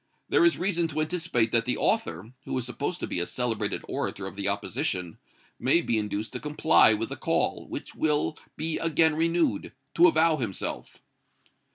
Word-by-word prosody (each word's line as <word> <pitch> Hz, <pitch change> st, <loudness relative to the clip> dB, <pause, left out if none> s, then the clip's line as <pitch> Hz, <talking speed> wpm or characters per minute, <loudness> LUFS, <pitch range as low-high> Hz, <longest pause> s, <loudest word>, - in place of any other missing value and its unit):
There -, -, +4 dB
is 335 Hz, -, +4 dB
reason 175 Hz, -2 st, 0 dB
to 155 Hz, 0 st, -2 dB
anticipate 155 Hz, -9 st, 0 dB
that 115 Hz, -1 st, +2 dB
the 125 Hz, -, 0 dB
author, 90 Hz, +8 st, -1 dB
who -, -, -3 dB
is 125 Hz, -, -2 dB
supposed 140 Hz, +8 st, -3 dB
to -, -, -1 dB
be -, -, -2 dB
a 85 Hz, -, -1 dB
celebrated 120 Hz, -3 st, -2 dB
orator 95 Hz, -, -3 dB
of 95 Hz, -, -7 dB
the 100 Hz, -1 st, -2 dB
opposition, 90 Hz, -3 st, -2 dB, 0.4 s
may 135 Hz, +8 st, +4 dB
be 115 Hz, -9 st, 0 dB
induced 105 Hz, +1 st, -3 dB
to -, -, -3 dB
comply 150 Hz, -6 st, +4 dB
with 115 Hz, +2 st, -3 dB
the -, -, -4 dB
call, -, -, -1 dB
which -, -, -6 dB
will 150 Hz, 0 st, 0 dB, 0.2 s
be 160 Hz, 0 st, -2 dB
again 160 Hz, -1 st, +3 dB
renewed, 165 Hz, -, 0 dB, 0.2 s
to 175 Hz, +2 st, +6 dB
avow 160 Hz, -1 st, +3 dB
himself." 110 Hz, -8 st, -4 dB
135 Hz, 180 wpm, -27 LUFS, 110-165 Hz, 0.4 s, to